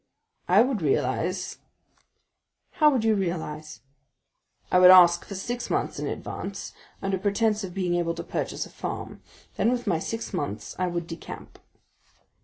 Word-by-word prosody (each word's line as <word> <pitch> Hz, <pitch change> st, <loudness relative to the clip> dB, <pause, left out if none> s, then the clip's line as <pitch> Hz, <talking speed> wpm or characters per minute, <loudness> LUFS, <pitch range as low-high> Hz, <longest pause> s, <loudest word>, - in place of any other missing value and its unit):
"I 195 Hz, +5 st, +6 dB
would 250 Hz, -6 st, -1 dB
realize——" 145 Hz, +4 st, -1 dB, 1.1 s
"How 305 Hz, -1 st, +5 dB
would 260 Hz, -6 st, +1 dB
you 225 Hz, -1 st, +4 dB
realize?" 160 Hz, -5 st, -3 dB, 0.9 s
"I 180 Hz, -, +5 dB
would 180 Hz, 0 st, +9 dB
ask 175 Hz, -2 st, +8 dB
for 200 Hz, -, -7 dB
six 240 Hz, +6 st, -4 dB
months' -, -, -1 dB
in -, -, -3 dB
advance, -, -, -6 dB, 0.3 s
under 195 Hz, -1 st, 0 dB
pretence 210 Hz, +2 st, +1 dB
of 185 Hz, -1 st, -7 dB
being 180 Hz, -3 st, 0 dB
able 170 Hz, -1 st, 0 dB
to 170 Hz, -, -5 dB
purchase -, -, -3 dB
a -, -, -14 dB
farm, -, -, -6 dB, 0.4 s
then 230 Hz, -, +3 dB
with 245 Hz, -1 st, -2 dB
my 175 Hz, -6 st, +1 dB
six 225 Hz, +6 st, -5 dB
months 145 Hz, -, -4 dB
I 185 Hz, -, +1 dB
would 170 Hz, -1 st, -3 dB
decamp." 165 Hz, 0 st, -9 dB
185 Hz, 155 wpm, -26 LUFS, 170-215 Hz, 1.1 s, would